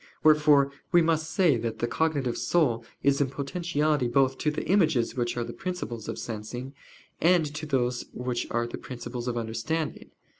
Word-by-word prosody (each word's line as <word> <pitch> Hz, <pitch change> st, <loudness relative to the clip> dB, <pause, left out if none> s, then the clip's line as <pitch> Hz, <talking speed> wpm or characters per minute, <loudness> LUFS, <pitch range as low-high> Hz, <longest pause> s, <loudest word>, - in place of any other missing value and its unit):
Wherefore 150 Hz, -2 st, +5 dB, 0.2 s
we 175 Hz, -2 st, +6 dB
must 160 Hz, -1 st, +1 dB
say 165 Hz, -7 st, +3 dB
that 115 Hz, -1 st, -3 dB
the 120 Hz, -, 0 dB
cognitive 140 Hz, -1 st, 0 dB
soul 125 Hz, -10 st, +1 dB, 0.2 s
is 140 Hz, 0 st, +3 dB
in 135 Hz, -, +2 dB
potentiality 150 Hz, -1 st, 0 dB
both 130 Hz, +2 st, +2 dB
to 155 Hz, -, +1 dB
the 150 Hz, -, -3 dB
images 160 Hz, -, +2 dB
which 120 Hz, -1 st, -1 dB
are 120 Hz, -, 0 dB
the -, -, -6 dB
principles 150 Hz, -, -5 dB
of -, -, -4 dB
sensing, 120 Hz, +4 st, -6 dB, 0.5 s
and 175 Hz, -1 st, +4 dB
to 155 Hz, +1 st, -5 dB
those 125 Hz, -3 st, 0 dB
which 125 Hz, -1 st, -3 dB
are 120 Hz, 0 st, 0 dB
the 120 Hz, -, -6 dB
principles 125 Hz, -1 st, -6 dB
of 120 Hz, -1 st, -1 dB
understanding. 115 Hz, +8 st, -3 dB
135 Hz, 175 wpm, -27 LUFS, 120-155 Hz, 0.5 s, we